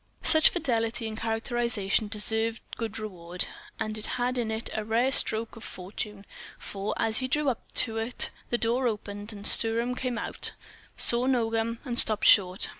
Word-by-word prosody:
Such 315 -1 +8
fidelity 230 -7 -2
in 220 -1 -5
characterization 225 -2 -1
deserved 220 +2 -2
good 225 -2 -5
reward, 180 -5 -3 0.3
and 215 0 -3
had 245 +3 -2
in 230 -2 -2
it 220 +1 -4
a 215 - -2
rare 230 +5 0
stroke 225 -3 +1
of 225 - -12
fortune; 200 +2 -6 0.3
for 200 +1 -5
as 220 0 +2
he 260 - -2
drew 295 +1 0
up 245 - -6
to 225 -2 +1
it, 230 +3 0 0.2
the 240 - 0
door 240 +2 0
opened, 205 -1 -5
and 205 -1 -10
Sturm 230 +3 +6
came 250 -1 -4
out, - - -3 0.4
saw 240 +2 +2
Nogam, 230 -2 -1
and 240 -2 +1
stopped 215 -1 +4
short. 185 -2 +4
225 Hz, 165 wpm, -27 LUFS, 215-240 Hz, 0.4 s, Such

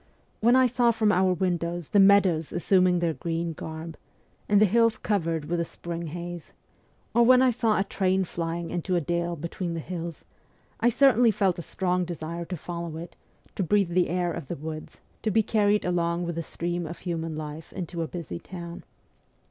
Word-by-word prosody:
When 235 +3 +5
I 260 0 +6
saw 245 -1 +3
from 220 -2 +3
our 185 0 +3
windows 175 -2 -1
the 205 - +4
meadows 195 -5 +5
assuming 180 0 +3
their 170 -2 0
green 165 0 -3
garb, 160 +1 -7 0.5
and 205 -1 +5
the 215 - +7
hills 230 +2 +3
covered 165 -7 -1
with 170 +3 -1
a - - +1
spring 170 0 -6
haze, 175 +1 -7 0.6
or 235 - +4
when 255 +2 +6
I 255 - +5
saw 225 -2 +1
a 195 - +2
train 190 -1 +1
flying 170 -1 -4
into 180 +1 -1
a - - +3
dale 170 +2 -1
between 170 +2 -4
the - - -3
hills, 170 0 -6 0.5
I 235 - +4
certainly 245 -1 +5
felt 190 -4 +1
a - - -3
strong 180 +2 -1
desire 170 0 -5
to 180 +1 -5
follow 170 0 -5
it, 170 +2 -8 0.4
to - - -2
breathe 195 0 +2
the 180 0 +2
air 175 0 0
of 165 -5 -6
the - - -4
woods, 155 +1 -8 0.2
to 220 - 0
be 220 +1 +3
carried 210 -1 +2
along 170 -1 0
with 170 - -3
the 165 - -3
stream 175 0 -3
of 170 - -7
human 165 -3 -4
life 155 +1 -7
into 175 -2 -5
a 165 - -2
busy 155 - -6
town. 170 -2 -8
175 Hz, 195 wpm, -26 LUFS, 165-200 Hz, 0.6 s, the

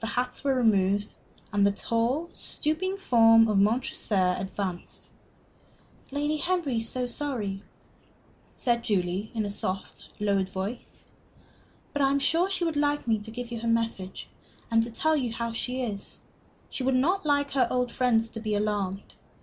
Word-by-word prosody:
The 225 - -2
hats 250 +2 -2
were 275 -1 +2
removed, 205 -4 +2 0.4
and 205 -1 +3
the 200 - +5
tall, 235 +11 -1
stooping 360 +6 -1
form 225 -9 +6
of 210 -2 +2
Montresor 200 -4 +2
advanced. 190 -2 -4 1.0
"Lady 295 +2 -1
Henry 340 -7 0
is 225 0 -2
so 255 -1 -2
sorry," 240 -7 -3 0.9
said 235 -2 0
Julie, 190 0 0
in 220 -2 0
a 200 - -3
soft, 190 -1 -4
lowered 200 -2 +1
voice. 195 +6 -6 0.9
"But 285 - 0
I 270 - +4
am 280 - +2
sure 330 +6 +2
she 380 -2 0
would 325 -3 -1
like 290 -2 +1
me 220 -2 +2
to 210 +2 -8
give 240 +1 -6
you 235 - -3
her 230 - -4
message 230 -5 -1 0.4
and 225 0 +5
to 230 - -2
tell 315 +7 +2
you 255 -6 -1
how 230 0 -3
she 250 +3 -2
is. 205 -4 -5 0.5
She - - -5
would 260 0 +2
not 355 +10 +2
like 285 -1 +1
her 260 -3 +3
old 250 -1 0
friends 230 -3 +2
to 225 - -7
be 215 -1 -1
alarmed. 205 -2 -2
230 Hz, 165 wpm, -27 LUFS, 205-275 Hz, 1.0 s, form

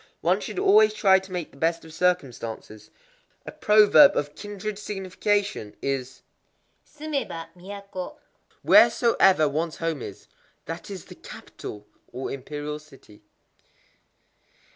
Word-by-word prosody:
One - - +2
should - - -7
always 420 +2 +5
try 190 - +5
to 190 0 -14
make 180 -3 -4
the - - -19
best 165 +2 -1
of 160 - -13
circumstances. 125 -11 -2 0.6
A - - -7
proverb 215 +7 +6
of 145 0 -2
kindred 205 +1 -6
signification 200 - -2
is, 135 -2 -4 0.6
Sumeba, 280 - -5
Miyako: 195 +4 -8 0.5
"Wheresoever 190 -9 +5
ones 155 +3 -2
home 165 -4 -3
is, 100 - -9 0.4
that 165 +4 -7
is 190 -4 -8
the - - -12
Capital 105 0 -10 0.3
[or, 130 +2 -5
imperial 150 +2 -6
City]." 135 -8 -18
38. - - -30
175 Hz, 120 wpm, -25 LUFS, 145-205 Hz, 0.6 s, proverb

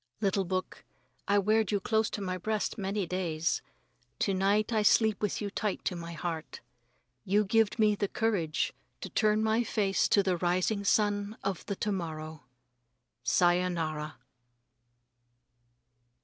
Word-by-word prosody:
Little 195 -2 +1
book, 185 +1 -3 0.4
I 200 - +3
weared 215 +1 +2
you 205 - +1
close 220 +2 +1
to 205 - -5
my 185 -1 -2
breast 215 +2 -2
many 200 -1 -2
days. 170 -2 -1 0.6
To 195 - +2
night 200 +4 +2
I 215 - +3
sleep 215 0 +3
with 210 - -1
you 205 -1 -3
tight 210 -1 -2
to 180 - -1
my 170 0 -6
heart. 165 -2 -5 0.6
You 205 +3 +2
gived 225 +2 +2
me 215 -2 +4
the 205 0 -1
courage 190 -9 0 0.3
to - - -5
turn 215 0 +2
my 220 +2 +2
face 200 -4 +1
to 200 - +4
the 185 -2 +1
rising 185 +4 0
sun 205 +1 +1
of 195 -2 -2
the 200 - -2
to 210 - -2
morrow. 160 -4 -5 0.8
_Sayonara. 170 -2 +1
195 Hz, 145 wpm, -30 LUFS, 180-210 Hz, 0.8 s, me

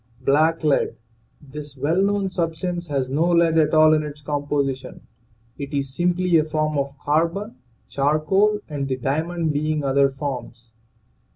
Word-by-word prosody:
BLACK 155 +5 +2
LEAD. 145 -6 +1 0.4
This 145 0 -10
well 155 +8 +1
known 200 -1 0
substance 175 0 -3
has 135 -3 -1
no 155 +6 +1
lead 170 -1 +4
at 155 0 +2
all 155 0 +6
in 155 - +3
its 150 -1 -7
composition; 145 -2 -3 0.5
it 140 +1 -5
is 135 -1 -2
simply 180 0 +2
a - - +2
form 155 0 -1
of 140 0 -2
carbon, 170 +9 -1 0.3
charcoal 175 +9 +1
and 145 -3 -3
the 130 -1 -2
diamond 160 +5 -1
being 155 +1 -1
other 140 0 +3
forms. 130 -4 -6
150 Hz, 150 wpm, -22 LUFS, 140-165 Hz, 0.5 s, all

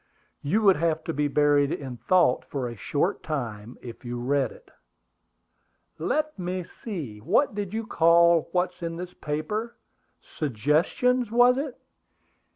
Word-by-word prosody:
"You 205 +10 +1
would 195 -3 +6
have 160 0 0
to 165 - -3
be 150 0 +1
buried 145 0 +3
in 135 -3 -4
thought 175 -4 +3
for 130 -1 -4
a 120 - -6
short 150 - -1
time 120 -7 -5
if 120 0 -9
you 120 0 -4
read 140 +3 0
it." - - -17 1.3
"Let 305 -6 -1
me 180 0 -3
see, 165 - -7
what 205 - +2
did 200 -2 -4
you 225 +1 -3
call 170 -3 +4
what's 180 0 -1
in 165 -1 -3
this 180 +1 -7
paper? 155 +10 -3 0.4
Suggestions, 155 - 0
was 245 +3 +5
it? 280 -3 -5
165 Hz, 145 wpm, -26 LUFS, 140-205 Hz, 1.3 s, would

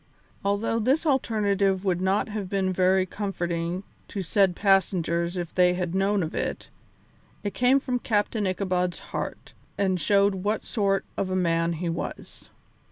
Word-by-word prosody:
Although 205 +3 0
this 270 +9 +2
alternative 200 -8 +1
would 180 -2 +1
not 190 +2 +1
have 205 -3 -4
been 190 -1 0
very 185 +1 +3
comforting 175 -2 -3 0.2
to 195 - -4
said 190 +1 +2
passengers 175 -3 +1
if 175 -2 -4
they 180 -1 +4
had 180 -1 -2
known 195 0 +2
of 160 - -4
it, - - -3 0.7
it 205 -2 -3
came 250 +5 +4
from 250 -2 -2
Captain 210 -2 0
Ichabod's 180 -2 -1 0.2
heart, - - -5 0.2
and 190 -3 +1
showed 200 +4 +3
what 205 +3 -1
sort 195 -3 0
of 190 - -1
a 185 - -1
man 170 -2 +1
he 170 +2 -3
was. 165 0 -6
190 Hz, 155 wpm, -26 LUFS, 180-205 Hz, 0.7 s, they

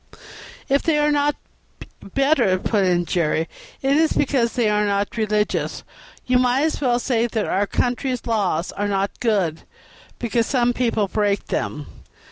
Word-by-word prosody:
"If 275 +1 +2
they 320 -2 +1
are 295 0 +2
not 290 0 +2 0.8
better," 270 -9 +3
put 200 +2 0
in 175 -1 +2
Jerry, 165 -1 0 0.4
"it 270 +1 +3
is 315 +1 +3
because 260 -5 +1
they 240 -3 +1
are 210 0 +2
not 200 0 -1
religious. 210 -2 -1 0.4
You 250 0 +3
might 255 +2 +2
as 315 -1 -1
well 245 -3 +2
say 240 -1 0
that 220 -2 -2
our 200 +2 0
country's 250 +2 -1
laws 195 -7 0
are 205 0 -2
not 195 0 -2
good 195 -9 0 0.6
because 235 -1 0
some 245 -2 +2
people 230 -4 0
break 205 0 0
them. 150 -1 -3
230 Hz, 155 wpm, -21 LUFS, 200-255 Hz, 0.8 s, better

